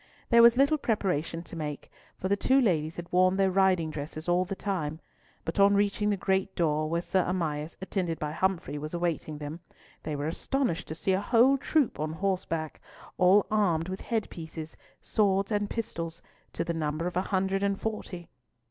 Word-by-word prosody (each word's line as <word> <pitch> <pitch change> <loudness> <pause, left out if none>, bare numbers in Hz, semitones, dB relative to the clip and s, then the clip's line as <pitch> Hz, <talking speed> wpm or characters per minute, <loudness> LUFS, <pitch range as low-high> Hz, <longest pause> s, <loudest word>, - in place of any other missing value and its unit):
There 235 -1 +7
was 235 +1 +7
little 280 +3 +4
preparation 180 - -1
to 175 - -10
make, 150 -3 -5 0.3
for 190 - -3
the 200 - +3
two 260 +6 +3
ladies 165 - +1
had 175 0 -8
worn 185 +1 +4
their 195 -1 +3
riding 185 -4 +3
dresses 155 +2 -6
all 175 +1 +2
the 195 +2 -4
time; 160 -7 -3 0.5
but 165 - -3
on 200 0 +6
reaching 205 +1 +1
the 205 - +1
great 190 0 0
door, 155 -2 +1
where 170 +1 -1
Sir 185 0 +1
Amias, 160 -4 -2
attended 180 -4 -2
by 150 -1 -3
Humfrey, 170 -3 -1
was 155 +3 -5
awaiting 170 -3 -2
them, 150 +2 -6 0.4
they 155 -1 -4
were 145 0 -3
astonished 180 - -1
to 155 - -5
see 165 +4 -1
a 190 - +1
whole 245 +5 +5
troop 275 - +1
on 155 +1 -2
horseback, 165 -3 -2 0.4
all 190 +2 +6
armed 180 -6 +2
with 190 - -5
head 225 -3 -1
pieces, 160 -2 -8 0.3
swords 195 -1 +1
and 205 -1 0
pistols, 170 -8 -4 0.3
to - - -1
the 170 0 -2
number 155 0 -2
of 180 - -3
a 180 - +2
hundred 195 0 0
and 200 -1 0
forty. 195 -5 -5
180 Hz, 190 wpm, -28 LUFS, 160-200 Hz, 0.5 s, There